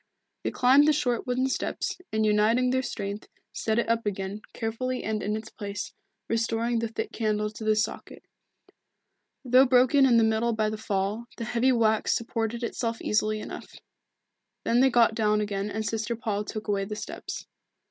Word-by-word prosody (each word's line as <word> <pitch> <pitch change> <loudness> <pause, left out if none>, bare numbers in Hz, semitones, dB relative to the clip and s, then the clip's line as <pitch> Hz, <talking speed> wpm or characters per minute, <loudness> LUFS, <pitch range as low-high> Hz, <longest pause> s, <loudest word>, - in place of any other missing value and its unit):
They - - -1
climbed 270 +4 +5
the 310 - +5
short 250 -4 0
wooden 255 +1 +1
steps, 265 - -2
and 220 0 +1
uniting 220 +4 +3
their 260 0 +2
strength, 200 -4 -5 0.3
set 220 0 -1
it 235 - +1
up 230 -1 0
again, 195 +1 -3
carefully 250 +3 -3
and 215 -1 -2
in 210 +1 -1
its 220 0 -9
place, 200 -1 -6 0.3
restoring 230 +1 0
the 230 - -1
thick 225 - -4
candle 210 -1 -1
to 220 - -9
the 215 0 +3
socket. 215 - -3 1.2
Though 255 +2 +6
broken 260 +2 +5
in 240 -2 +5
the 230 - +5
middle 220 +1 +2
by 215 -1 0
the - - -3
fall, 205 +1 -2
the 230 - -4
heavy 240 +3 +2
wax 220 -3 +2
supported 230 0 -2
itself 230 -1 -2
easily 215 0 0
enough. - - -8 0.9
Then 235 - +2
they 265 +1 +6
got 235 -3 +4
down 215 -1 +2
again 205 -1 -2
and 220 +1 -3
Sister 225 +2 -2
Paul 210 -2 -2
took 215 +1 -6
away 200 -1 0
the 210 +1 -5
steps. - - -6
225 Hz, 180 wpm, -27 LUFS, 215-240 Hz, 1.2 s, Though